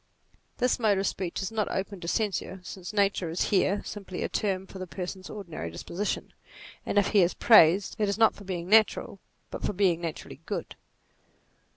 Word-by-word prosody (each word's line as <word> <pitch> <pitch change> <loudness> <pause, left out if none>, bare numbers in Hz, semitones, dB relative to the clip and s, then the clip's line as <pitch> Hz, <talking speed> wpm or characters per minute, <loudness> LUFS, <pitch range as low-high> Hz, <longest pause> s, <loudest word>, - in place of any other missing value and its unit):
This 250 0 +1
mode 215 -4 +3
of 195 - 0
speech 185 0 -2
is 195 - -3
not 220 -2 -1
open 195 0 -3
to 170 - -7
censure, 195 -1 -1
since 180 0 -7
nature 200 -4 +1
is 165 - -1
here 195 0 +2
simply 195 -3 -6
a - - -2
term 190 -3 -1
for 190 - -11
the 185 - -5
person's 185 +1 -6
ordinary 170 - -6
disposition, 170 - -4 0.5
and - - -1
if 200 - +4
he 205 - +5
is 175 0 +2
praised 190 -3 +6
it 210 -2 +2
is 200 - -1
not 225 -1 +5
for 205 - -13
being 180 -3 -4
natural, 215 -1 +3 0.3
but - - -6
for - - -1
being 180 -3 +2
naturally 165 -3 -6
good. - - -4
195 Hz, 190 wpm, -28 LUFS, 180-205 Hz, 0.5 s, praised